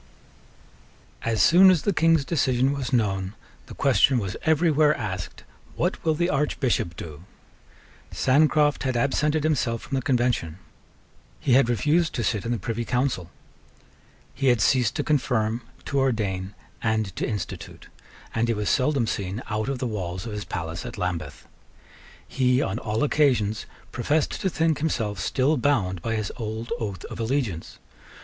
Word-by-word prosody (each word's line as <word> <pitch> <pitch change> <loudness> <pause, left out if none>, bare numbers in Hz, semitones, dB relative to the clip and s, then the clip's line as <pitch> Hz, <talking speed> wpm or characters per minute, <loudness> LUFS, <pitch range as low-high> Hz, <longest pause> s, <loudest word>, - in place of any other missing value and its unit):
As 110 -4 +1
soon 185 - +7
as 180 -6 +3
the 205 - +1
King's 165 -4 +3
decision 130 -4 +1
was 140 -3 -4
known, 100 -5 0 0.3
the - - -10
question 135 - +3
was 95 -5 -2
every 160 +1 +3
where 150 0 +4
asked, 95 -7 -5 0.3
What - - -1
will 160 -1 +2
the 175 +3 +1
Archbishop 135 - 0
do? 80 0 -9 0.9
Sancroft 150 +2 +3
had 130 -2 -1
absented 150 +4 +1
himself 120 -7 0
from - - -9
the 135 - +1
Convention: 120 - 0 0.8
he 130 - +1
had 130 -2 +5
refused 155 +7 +1
to 120 - -1
sit 105 -2 -1
in - - -1
the 120 - 0
Privy 115 +3 -3
Council: 125 -8 -1 1.0
he 135 - -1
had 120 -3 +4
ceased 120 +2 +2
to - - -1
confirm, 120 -6 0 0.2
to 140 - 0
ordain, 100 -7 -1 0.3
and 110 -4 -1
to - - -2
institute; 105 -5 -6 0.5
and 115 +1 +1
he 115 - +1
was 105 -1 0
seldom 135 -2 +2
seen 100 +1 -3
out 110 +4 -1
of 140 - -2
the 125 - -3
walls 95 -5 -4
of 115 - -5
his 105 0 -5
palace 80 -2 -5
at - - -7
Lambeth. 90 -3 -4 0.8
He, 125 -1 +2
on 110 -5 -1
all 110 +1 -1
occasions, 125 -8 +1 0.2
professed 145 +5 0
to 190 - +1
think 160 -2 +1
himself 110 -10 -1
still 140 +4 +1
bound 105 -10 +1
by 115 +5 -2
his 110 -2 -2
old 110 +1 -5
oath 100 -7 -5
of - - -8
allegiance. 115 - -2
120 Hz, 160 wpm, -25 LUFS, 105-140 Hz, 1.0 s, soon